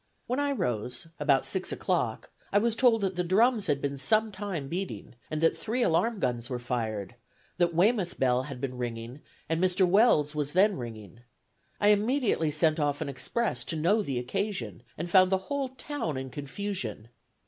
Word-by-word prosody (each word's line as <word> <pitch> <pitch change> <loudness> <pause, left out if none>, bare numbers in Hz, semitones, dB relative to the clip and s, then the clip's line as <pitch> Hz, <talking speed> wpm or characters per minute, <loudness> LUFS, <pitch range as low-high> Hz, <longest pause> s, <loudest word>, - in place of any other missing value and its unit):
When 250 +3 -1
I 285 0 +1
rose, 125 - -2
about 140 -3 +3
six 190 -1 0
o'clock, - - -1 0.2
I - - +3
was 225 +2 +2
told 230 -2 +4
that 190 -2 -1
the 180 - +1
drums 210 +4 +3
had 140 - +1
been 140 -1 -2
some 215 +10 +2
time 190 -8 -4
beating, 180 0 -5 0.2
and 155 0 -3
that 165 - +3
three 240 +3 -1
alarm 220 +6 +1
guns 120 -4 -1
were 125 - -2
fired; 115 -5 -3 0.5
that 170 -1 +2
Weymouth 190 0 +2
bell 125 -1 +3
had 130 -1 -7
been 125 -1 -4
ringing, 120 +3 -5 0.3
and 165 +2 0
Mr. 185 0 +3
Weld's 175 -7 +4
was 150 -1 -2
then 195 +3 +4
ringing. 115 - -8 0.6
I 205 - +4
immediately 210 - +2
sent 155 +1 +2
off 145 -1 0
an 150 - -2
express 140 - -1
to - - -3
know 180 +8 +2
the 140 -10 -3
occasion, 125 - -3 0.2
and 170 - -3
found 185 +1 +5
the 190 - +4
whole 270 +8 -3
town 260 - -4
in 130 0 -5
confusion. 140 - -4
165 Hz, 180 wpm, -28 LUFS, 130-205 Hz, 0.6 s, found